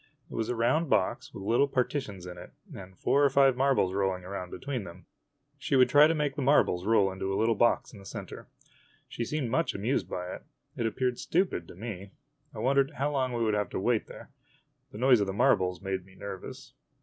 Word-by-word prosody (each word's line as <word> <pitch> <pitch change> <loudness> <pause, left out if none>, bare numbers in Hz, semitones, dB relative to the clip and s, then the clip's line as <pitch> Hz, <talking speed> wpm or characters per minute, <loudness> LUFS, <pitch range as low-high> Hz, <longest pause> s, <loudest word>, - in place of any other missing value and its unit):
It - - -9
was 110 -1 -2
a 125 - -1
round 130 +8 +1
box - - 0
with 95 - -9
O - - -8
little 120 +6 +3
partitions 125 -8 -2
in 90 0 -8
it, 90 - -12 0.2
and 95 -1 -11
four 145 - +2
or 140 - +5
five 135 -1 +4
marbles 130 -8 +2
rolling 95 -2 -1
around 90 -1 -6
be - - -7
tween 130 -5 -4
them. 90 0 -12 0.5
She 135 - -1
would 130 -1 +5
try 145 +3 +7
to 165 - +1
make 150 -2 -1
the 145 - -3
marbles 115 -9 +3
roll 100 -4 +4
into 95 +1 -4
a 95 - -1
little 115 +1 +3
box 120 +3 +1
in 105 - -11
the 100 - -14
center. - - -8 0.6
She 120 - -4
seemed 130 -1 -2
much 165 - 0
amused 115 +8 -1
by 90 0 -4
it. - - -8 0.3
It 115 - -1
appeared 125 +2 -1
stupid 175 - 0
to - - -12
me. 100 -1 -7 0.4
I - - -13
wondered 135 +5 +2
how 145 +2 -1
long 130 -3 0
we 115 -1 0
should 110 - +1
have 105 0 0
to - - -3
wait 115 +2 0
there. - - -12 0.6
The - - -9
noise 125 0 +5
of 100 - 0
the 95 - -3
marbles 90 -3 +2
made 95 -1 -3
me 95 +1 -19
nervous. 95 -2 -8
115 Hz, 230 wpm, -29 LUFS, 95-135 Hz, 0.6 s, try